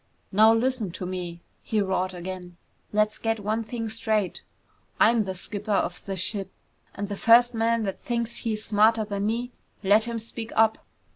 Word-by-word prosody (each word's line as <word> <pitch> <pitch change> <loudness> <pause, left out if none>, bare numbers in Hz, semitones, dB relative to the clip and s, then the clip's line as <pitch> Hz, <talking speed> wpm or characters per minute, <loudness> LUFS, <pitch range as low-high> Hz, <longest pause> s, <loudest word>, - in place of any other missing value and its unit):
"Now 215 +3 +6
listen 230 -2 +1
to 180 - -5
me!" 175 -2 -5 0.2
he 220 - -1
roared 190 -2 0
again. 180 0 -7 0.3
"Let's 215 0 +1
get 225 -1 0
one 215 +2 -1
thing 225 0 -4
straight! 220 -3 -1 0.6
I'm 225 -2 +5
the 190 -1 -4
skipper 205 +3 -4
of 180 -2 -1
this 195 -2 -4
ship 195 +1 -3 0.5
and 205 0 -3
the 205 - -4
first 240 +4 +5
man 230 0 +1
that 195 -2 -4
thinks 235 -1 -2
he's 215 -2 -2
smarter 220 +1 +4
than 200 0 -2
me, 240 +3 -2 0.3
let 210 +3 +5
him 235 -1 -3
speak 225 0 -5
up!" 220 0 +4
215 Hz, 170 wpm, -26 LUFS, 195-225 Hz, 0.6 s, Now